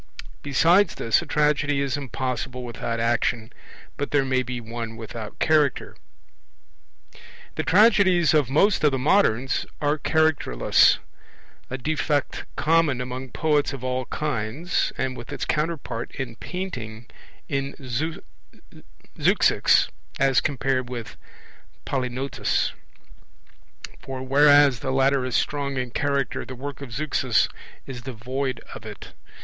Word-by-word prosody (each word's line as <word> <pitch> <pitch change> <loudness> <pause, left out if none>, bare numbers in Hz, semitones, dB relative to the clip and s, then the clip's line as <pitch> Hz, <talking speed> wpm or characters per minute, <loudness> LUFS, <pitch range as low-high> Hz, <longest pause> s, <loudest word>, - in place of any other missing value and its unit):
Besides 170 +7 +3
this, 115 +6 +2
a 170 - -9
tragedy 145 -1 +1
is 140 -1 0
impossible 130 -2 -4
without 115 -1 -4
action, 115 0 0 0.4
but 145 - -2
there 145 -2 +2
may 130 -1 +1
be 125 -1 -4
one 115 -1 -6
without 110 -1 -8
Character. 150 -4 +1 1.6
The - - -2
tragedies 185 -5 +4
of 150 -5 +3
most 190 +7 +3
of 150 - +6
the 135 - -1
moderns 130 - +2
are 150 +1 0
characterless 155 - +3 0.7
a 130 - -3
defect 145 +1 -1
common 155 -4 +2
among 125 +1 -5
poets 150 0 +1
of 135 -2 -7
all 130 0 -2
kinds, 145 +4 -2
and 130 -1 -2
with 120 - -9
its - - -3
counterpart 150 -7 -2
in 125 -4 -5
painting 120 -11 -6 0.4
in 140 -1 -2 1.4
Zeuxis - - +4 0.3
as 135 -2 +4
compared 130 -2 -1
with 120 -3 -6 0.7
Polygnotus; 130 0 -1 1.3
for 130 -1 -6
whereas 145 -1 +5
the 130 - -4
latter 135 0 +2
is 130 - -2
strong 140 -2 -1
in 125 -1 -3
character, 140 0 -1
the 130 - -8
work 140 +2 -7
of 140 - -7
Zeuxis 130 -3 +1 0.4
is 125 -2 -7
devoid 130 +1 -4
of - - -9
it. - - -10
135 Hz, 120 wpm, -24 LUFS, 125-150 Hz, 1.6 s, of